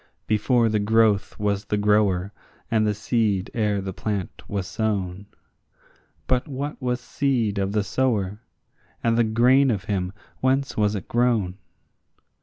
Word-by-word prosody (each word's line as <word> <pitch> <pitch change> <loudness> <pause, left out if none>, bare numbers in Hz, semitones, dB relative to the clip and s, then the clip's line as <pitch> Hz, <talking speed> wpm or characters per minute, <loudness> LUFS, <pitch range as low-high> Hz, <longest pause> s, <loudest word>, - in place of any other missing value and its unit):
Before 115 +2 +2
the 110 -1 +1
growth 110 -1 +2
was 100 -1 -1
the 105 - -1
grower, 105 -2 +2 0.4
and 110 -1 +3
the 105 - +2
seed 105 -3 0
ere 105 -3 0
the 95 0 -5
plant 100 -1 -4
was 100 -2 -2
sown; 100 -2 -2 1.0
But 130 +3 +1
what 145 +1 -5
was 125 -1 -1
seed 125 -6 0
of 100 0 -1
the 105 -1 +1
sower? 105 -3 0 0.6
and 115 -1 +2
the 120 - +4
grain 125 +5 +4
of 100 -6 -1
him, 95 -3 -2 0.3
whence 135 +1 +1
was 105 -1 +1
it 100 - -5
grown? 115 -6 +1
105 Hz, 145 wpm, -24 LUFS, 100-120 Hz, 1.0 s, the